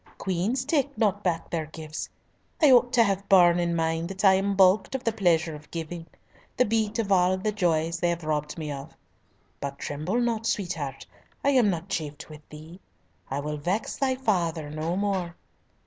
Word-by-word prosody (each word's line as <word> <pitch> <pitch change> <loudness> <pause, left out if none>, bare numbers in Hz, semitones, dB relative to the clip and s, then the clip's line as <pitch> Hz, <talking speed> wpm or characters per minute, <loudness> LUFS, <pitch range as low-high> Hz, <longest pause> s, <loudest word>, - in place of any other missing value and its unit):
Queens 195 +8 -1
take 285 -1 0
not 205 -2 +1
back 170 -3 -1
their 160 -2 -2
gifts. 155 0 -7 0.5
I 300 -4 +6
ought 245 -1 +5
to 235 - +6
have 200 -2 -1
borne 175 -2 +6
in 170 -1 0
mind 165 +1 -1
that 195 +1 -2
I 190 - +8
am 195 +1 +1
balked 190 +5 +4
of 265 - -3
the 230 - +1
pleasure 170 -6 +1
of 150 0 -11
giving—the 170 +8 -5
beat 220 0 0
of 215 -3 -1
all 185 0 +4
the 210 +3 -1
joys 170 -4 0
they 175 - +1
have 170 -1 -2
robbed 150 0 -2
me 155 -2 -4
of. 140 0 -8 0.6
But 140 0 -5
tremble 155 +13 -2
not, 230 -2 0
sweetheart, 160 -9 -3 0.4
I 280 - +3
am 250 -6 +4
not 175 -1 -3
chafed 155 -3 -5
with 150 0 -11
thee. 155 +4 -11 0.5
I 135 +2 -2
will 150 +1 -4
vex 180 +9 -2
thy 265 -2 0
father 170 - -1
no 155 +3 -2
more. 190 -4 -1
180 Hz, 185 wpm, -26 LUFS, 160-210 Hz, 0.6 s, I